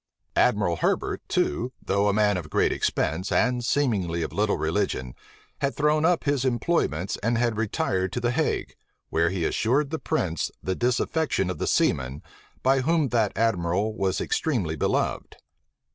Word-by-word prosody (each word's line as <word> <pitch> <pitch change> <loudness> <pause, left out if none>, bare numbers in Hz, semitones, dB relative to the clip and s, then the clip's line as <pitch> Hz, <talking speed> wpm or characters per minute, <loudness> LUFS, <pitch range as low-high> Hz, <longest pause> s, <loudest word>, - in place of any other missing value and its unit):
Admiral 100 -8 +2
Herbert - - 0
too, 120 - 0
though 100 +1 +1
a - - +4
man 105 -1 +3
of 85 -4 -5
great - - +2
expense, 95 +4 -1
and 125 +1 +2
seemingly 100 - 0
of - - -5
little 105 +1 +1
religion, 80 -7 -1 0.5
had 140 0 -1
thrown 150 +1 +2
up 175 0 +2
his 140 -3 +1
employments, 120 - 0
and 115 +3 +1
had 120 -1 +1
retired 95 -4 -1
to - - -1
the 120 0 0
Hague, 155 +5 -1 0.4
where 85 +1 +2
he 90 -2 -2
assured 135 +5 +1
the 160 - -2
prince 90 - -1
of - - -28
the 95 - -1
disaffection 125 - 0
of 85 - -7
the - - -1
seamen, 65 +1 +1 0.4
by 135 +1 +3
whom 155 0 +2
that 115 -4 +1
admiral 100 -1 +1
was 95 -3 0
extremely 105 - -1
beloved. - - -1
110 Hz, 160 wpm, -25 LUFS, 90-130 Hz, 0.5 s, a